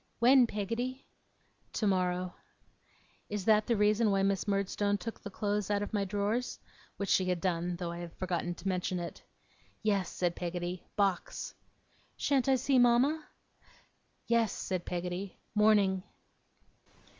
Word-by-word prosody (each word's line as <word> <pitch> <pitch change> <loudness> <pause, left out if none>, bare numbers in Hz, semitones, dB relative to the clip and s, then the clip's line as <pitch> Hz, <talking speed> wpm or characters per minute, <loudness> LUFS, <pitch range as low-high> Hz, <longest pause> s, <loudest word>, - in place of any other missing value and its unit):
'When, 250 +1 +6
Peggotty?' 235 +6 -3 0.7
'Tomorrow.' 185 -3 0 1.0
'Is 205 -2 -3
that 215 -1 +4
the 235 - +2
reason 210 +2 +3
why 195 -1 +2
Miss 195 +1 +1
Murdstone 200 +1 +1
took 230 +2 -7
the 205 - -6
clothes 205 0 -1
out 205 0 +1
of 205 - -6
my 200 -2 +1
drawers?' 205 +5 -1 0.4
which 200 - -2
she 185 - +3
had 180 -1 0
done, 175 0 -1
though 170 -1 -4
I 170 - -6
have 175 -1 -7
forgotten 175 -1 -2
to 195 - -7
mention 185 -1 0
it. 170 -1 -6 0.6
'Yes,' 200 -4 +1
said 175 -1 -1
Peggotty. 175 0 -4
'Box.' 195 -4 0 0.6
'Shan't 275 -2 +2
I 265 - +6
see 260 0 +3
mama?' 255 +6 +4 1.0
'Yes,' 230 -3 +2
said 185 -2 -3
Peggotty. 180 +2 -4 0.2
'Morning. 210 -3 +4
200 Hz, 140 wpm, -31 LUFS, 180-220 Hz, 1.0 s, When